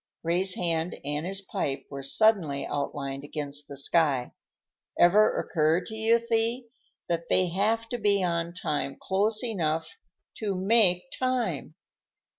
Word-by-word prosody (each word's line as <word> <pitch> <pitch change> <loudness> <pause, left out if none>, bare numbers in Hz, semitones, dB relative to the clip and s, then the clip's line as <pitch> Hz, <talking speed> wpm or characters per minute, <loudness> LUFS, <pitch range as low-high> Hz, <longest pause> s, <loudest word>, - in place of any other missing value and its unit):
Ray's 180 +3 +2
hand 165 -1 -1
and 150 +3 -2
his 195 +1 -2
pipe 140 -7 -3
were 140 -1 -5
suddenly 160 -2 +2
outlined 140 -1 -4
against 145 -1 -4
the 140 - -8
sky. 140 -3 +1 0.7
"Ever 200 +5 +5
occur 160 +1 +1
to 220 - -8
you, 220 +1 +3
Thee, 235 +1 -1 0.4
that 170 -1 -2
they 185 -1 +2
have 220 +6 0
to 245 - -3
be 200 -2 +2
on 170 -1 -1
time 150 -5 -3
close 210 +4 +1
enough 165 -8 -2 0.4
to 205 -3 -2
_make 190 -2 +4 0.2
time? 245 - -1
175 Hz, 135 wpm, -27 LUFS, 150-215 Hz, 0.7 s, Ever